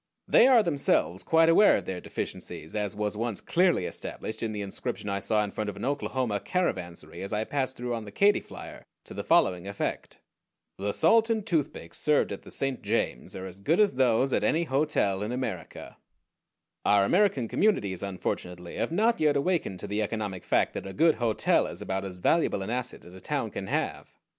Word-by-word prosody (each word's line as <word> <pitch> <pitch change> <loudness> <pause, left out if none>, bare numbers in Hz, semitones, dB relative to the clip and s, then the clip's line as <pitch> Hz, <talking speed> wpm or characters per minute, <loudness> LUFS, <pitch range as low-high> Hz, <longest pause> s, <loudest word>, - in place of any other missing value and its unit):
They 245 - +6
are 245 -4 +6
themselves 140 - +1
quite 165 0 +4
aware 175 +5 +6
of 95 - -3
their 90 -1 -4
deficiencies, 80 - -6
as 105 -1 -2
was 105 0 -2
once 115 -1 -2
clearly 175 - +2
established 110 - -6
in 115 - -2
the 105 -1 -4
inscription 100 +1 -5
I 100 0 -1
saw 105 +1 +1
in 105 - -4
front 105 0 -3
of 105 - -6
an - - -5
Oklahoma 130 -6 -1
caravansary 85 - -3
as 100 - -5
I 105 0 0
passed 130 +1 -2
through 120 0 -3
on 115 -2 -4
the 100 - -9
Katy 200 - +4
Flyer, - - -11 0.2
to - - -10
the - - -4
following 90 0 +2
effect: 100 0 -4 0.6
THE 100 +1 -1
SALT 225 - +4
AND 220 -3 0
TOOTHPICKS 150 - -2
SERVED 150 -1 +2
AT - - -5
THE - - -13
SAINT 135 -2 -2
JAMES 105 - -2
ARE 95 - -6
AS 95 0 -9
GOOD 155 - +1
AS 210 -5 +4
THOSE 130 0 +2
AT - - +1
ANY 165 +2 +2
HOTEL 135 - +1
IN 105 +3 -3
AMERICA 125 +1 -5 0.9
Our 100 -1 +4
American 175 - +2
communities, 105 - +1
unfortunately, 90 -2 -4
have - - -1
not 225 +7 +2
yet 150 -2 +3
awakened 145 - -1
to - - -5
the 105 +2 -1
economic 105 -3 -3
fact - - +1
that - - -5
a 95 - -7
good 160 +1 +4
hotel 115 -3 +2
is - - -8
about 95 0 -3
as 95 -2 -6
valuable 100 - +1
an 105 - -4
asset 125 0 -4
as 90 - -12
a 95 - -11
town - - -2
can - - -5
have. - - -2
110 Hz, 200 wpm, -28 LUFS, 100-155 Hz, 0.9 s, They